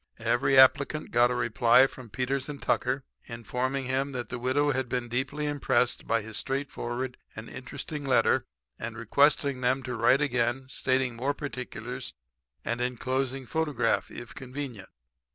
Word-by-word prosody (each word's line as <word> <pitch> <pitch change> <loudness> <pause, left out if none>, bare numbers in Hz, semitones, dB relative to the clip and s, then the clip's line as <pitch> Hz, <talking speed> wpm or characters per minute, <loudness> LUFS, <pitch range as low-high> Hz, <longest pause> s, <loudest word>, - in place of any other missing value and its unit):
"Every 120 +4 +2
applicant 140 +3 +5
got 120 +1 +5
a 125 - -1
reply 120 +2 +5
from 130 -3 -8
Peters 130 +4 -2
& - - -18
Tucker 130 +2 0 0.2
informing 125 +4 -3
him 135 +2 -1
that 125 -2 -4
the 125 - -4
widow 140 +4 +2
had 130 -2 -1
been 125 -1 -1
deeply 135 +5 -1
impressed 135 -4 +1
by 115 -1 +1
his 110 0 -4
straightforward 130 -2 -3 0.2
and 110 +1 -7
interesting 145 +3 -6
letter 135 -3 +3 0.3
and 115 0 -5
requesting 140 +3 +2
them 130 +2 +1
to 125 0 -4
write 130 +3 +4
again; 130 -2 +1
stating 130 -2 0
more 135 +5 -1
particulars; 125 -3 -5 0.5
and 120 +1 -1
enclosing 130 +2 -1
photograph 150 -6 0
if 120 - -9
convenient. 130 -6 -7
130 Hz, 150 wpm, -28 LUFS, 120-135 Hz, 0.5 s, applicant